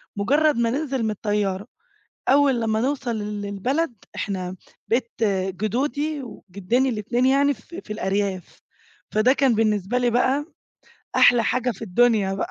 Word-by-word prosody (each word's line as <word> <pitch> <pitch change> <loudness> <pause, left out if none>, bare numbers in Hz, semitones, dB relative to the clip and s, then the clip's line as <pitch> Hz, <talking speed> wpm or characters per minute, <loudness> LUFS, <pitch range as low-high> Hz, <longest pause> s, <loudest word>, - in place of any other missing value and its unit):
مجرد 290 +7 +2
ما 235 -1 +2
ننزل 270 -2 -2
من 220 - 0
الطيارة، 205 -1 -2 0.6
أول 275 -3 +4
لمّا 220 0 0
نوصل 260 -3 -1
للبلد 210 - -2 0.2
إحنا 185 -2 -3 0.3
بيت 235 0 0 0.5
جدودي 285 +7 -1
وجدّيني 230 +4 -2
الاتنين 240 +3 0
يعني 280 +2 +4
في 345 +6 -11
في 210 - -7
الأرياف، 195 -2 -2 0.5
فده 225 +5 +4
كان 270 -5 +2
بالنسبة 215 +1 +1
لي 245 -1 +2
بقى 260 +5 +1 0.7
أحلى 240 -2 +6
حاجة 255 0 +1
في 215 - -8
الدنيا 210 -1 +2
بقى، 195 - -3
230 Hz, 135 wpm, -23 LUFS, 205-265 Hz, 0.7 s, أحلى